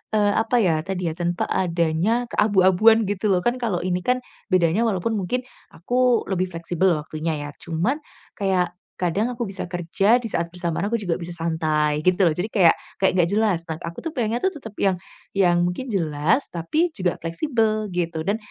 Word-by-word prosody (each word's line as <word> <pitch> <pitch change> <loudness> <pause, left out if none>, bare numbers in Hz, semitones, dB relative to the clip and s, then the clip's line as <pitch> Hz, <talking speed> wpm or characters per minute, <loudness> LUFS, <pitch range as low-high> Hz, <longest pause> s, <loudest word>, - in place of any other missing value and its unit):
eee, 205 -1 +3
apa 225 +2 +2
ya, 165 -4 +2
tadi 185 -1 -3
ya, - - -8
tanpa 175 0 -1
adanya 175 +6 +1
keabu-abuan, 210 +2 +4
gitu 205 +1 -1
loh. 185 - +3
Kan 240 +1 +1
kalau 220 -8 -1
ini 180 0 0
kan 250 +4 +1 0.3
bedanya 180 +3 +3
walaupun 205 +1 -1
mungkin 195 +7 -1 0.4
aku 245 +6 +2
lebih 185 0 0
fleksibel 170 +2 0
waktunya 155 +1 -3
ya, - - -7
cuman 175 - -1 0.4
kayak 185 -3 +1 0.3
kadang 180 +5 +1
aku 240 0 -3
bisa 195 0 -5
kerja 175 +5 +2
di 230 - -5
saat 170 0 -1
bersamaan 175 0 -2
aku 230 - 0
juga 180 -4 -1
bisa 175 0 -6
santai 155 -3 0
gitu 185 +1 +3
loh. 170 - +5
Jadi 175 +5 -2
kayak 190 -7 +4 0.2
kayak 190 - +4
gak - - -4
jelas. 210 -5 +2
Nah, 160 - -3
aku 170 0 -6
tuh 325 - -3
pengennya 230 -2 0
tuh 380 +8 0
tetap 225 - -10
yang 195 -2 +3 0.4
yang 175 -3 +3
mungkin 180 +9 -3
jelas, 160 - +1
tapi 305 - 0
juga 180 -2 0
fleksibel 215 - 0
gitu 170 -2 -2
dan 200 +5 0
185 Hz, 185 wpm, -23 LUFS, 170-220 Hz, 0.4 s, loh